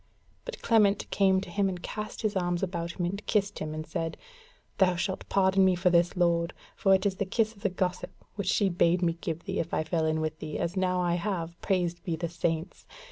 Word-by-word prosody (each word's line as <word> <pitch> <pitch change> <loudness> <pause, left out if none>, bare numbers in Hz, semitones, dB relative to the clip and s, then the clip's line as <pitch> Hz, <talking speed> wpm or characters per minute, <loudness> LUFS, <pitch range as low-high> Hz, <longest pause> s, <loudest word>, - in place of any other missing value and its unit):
But - - -7
Clement 210 -3 +3
came 190 -1 +3
to 180 - -8
him 195 +1 +1
and 180 -1 -4
cast 215 +2 -5
his 215 -1 0
arms 175 -1 0
about 170 -2 -2
him, 175 - -2
and 200 +4 -3
kissed 200 -1 +1
him, 155 0 -4
and 155 0 -5
said: 165 -2 -3 0.6
"Thou 185 -2 +4
shalt 190 +2 -3
pardon 190 0 +4
me 185 -1 +4
for 180 +1 +2
this, 175 +1 +3
lord, 170 -1 +2 0.2
for 195 -1 +4
it 190 - -1
is 195 -2 +1
the - - 0
kiss 220 +3 0
of 200 - -19
the 205 - +1
gossip 180 0 -2 0.2
which 200 -2 -4
she 200 0 +3
bade 175 0 +2
me 170 -1 +2
give 165 0 -3
thee, 195 0 -3
if 165 - -2
I - - +1
fell 160 0 0
in 155 0 +1
with 155 0 -3
thee, 155 -1 -5
as 170 +3 -2
now 185 -1 +1
I 175 -1 +1
have, 170 -5 -3
praised 175 -3 0
be 170 - -1
the 165 +1 -3
Saints! 165 0 -3
180 Hz, 235 wpm, -28 LUFS, 170-195 Hz, 0.6 s, Thou